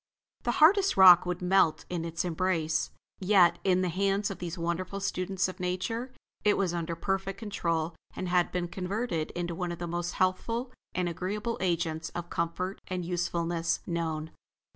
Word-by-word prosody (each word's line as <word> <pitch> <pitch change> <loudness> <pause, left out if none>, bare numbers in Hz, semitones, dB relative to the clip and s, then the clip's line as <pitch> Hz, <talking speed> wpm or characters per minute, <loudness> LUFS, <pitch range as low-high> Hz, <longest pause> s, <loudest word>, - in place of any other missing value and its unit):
The 240 - 0
hardest 385 +7 +5
rock 180 -2 +9
would 180 0 -3
melt 180 -3 +3
in 170 -2 -3
its 165 +3 -3
embrace; 165 -2 0 0.3
yet, 180 -3 +4
in 185 -1 +3
the 185 - 0
hands 195 +3 0
of 185 - -7
these 175 0 -5
wonderful 170 +3 -2
students 190 -1 -1
of 185 - -8
Nature, 190 +8 -2 0.3
it 210 - +4
was 185 -3 0
under 170 -1 -2
perfect 195 +2 -2
control 170 -7 -2 0.2
and 185 - -3
had 180 0 +2
been 180 -1 -1
converted 185 -2 -2
into 175 0 -2
one 175 0 -3
of 170 - -5
the 175 - -4
most 175 +1 -3
healthful 230 +7 0 0.2
and 180 -1 0
agreeable 205 +7 -3
agents 165 -3 -1
of 175 0 -5
comfort 180 +3 -2
and 180 -2 -3
usefulness 170 -1 -1
known. 160 -2 -2
180 Hz, 165 wpm, -29 LUFS, 170-195 Hz, 0.3 s, rock